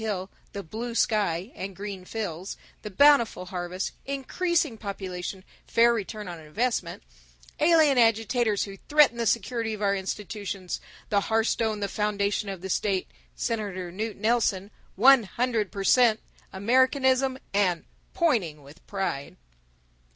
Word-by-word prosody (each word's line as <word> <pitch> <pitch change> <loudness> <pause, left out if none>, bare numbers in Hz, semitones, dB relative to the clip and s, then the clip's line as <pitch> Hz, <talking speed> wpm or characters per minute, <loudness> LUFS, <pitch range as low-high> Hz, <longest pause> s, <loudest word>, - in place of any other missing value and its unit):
Hill, 195 -3 -3 0.2
the 200 - -5
Blue 230 +7 -5
Sky, 205 -3 +1
the 190 - -4
Green 195 -1 -7
Fields, 190 -4 -5 0.2
the 210 - -6
Bountiful 235 -4 +4
Harvest, 180 0 -4 0.2
Increasing 300 +1 0
Population, 190 -3 -6 0.2
Fair 235 +1 +4
Return 210 -2 -4
on 175 -2 -7
Investments, 220 +11 -2 0.5
Alien 310 -4 +5
Agitators 225 -1 +2
Who 195 -1 -8
Threaten 295 -5 +5
the 230 -1 0
Security 230 +1 0
of 210 - -11
Our 200 0 +2
Institutions, 195 -1 -4 0.3
the 200 -1 +2
Hearthstone 220 0 0
the 200 - 0
Foundation 205 0 -1
of 190 -3 -6
the 190 - -6
State, 195 -2 0 0.2
Senator 200 -6 -3
Knute 215 +3 -4
Nelson, 215 -3 +1 0.2
One 260 +5 +7
Hundred 225 -1 -1
Per 195 - -4
Cent. 230 0 +5 0.3
Americanism, 260 +5 +2 0.2
and 185 -4 +1 0.3
Pointing 215 - +1
with 145 +5 -16
Pride. 190 -8 -3
210 Hz, 130 wpm, -26 LUFS, 190-235 Hz, 0.5 s, One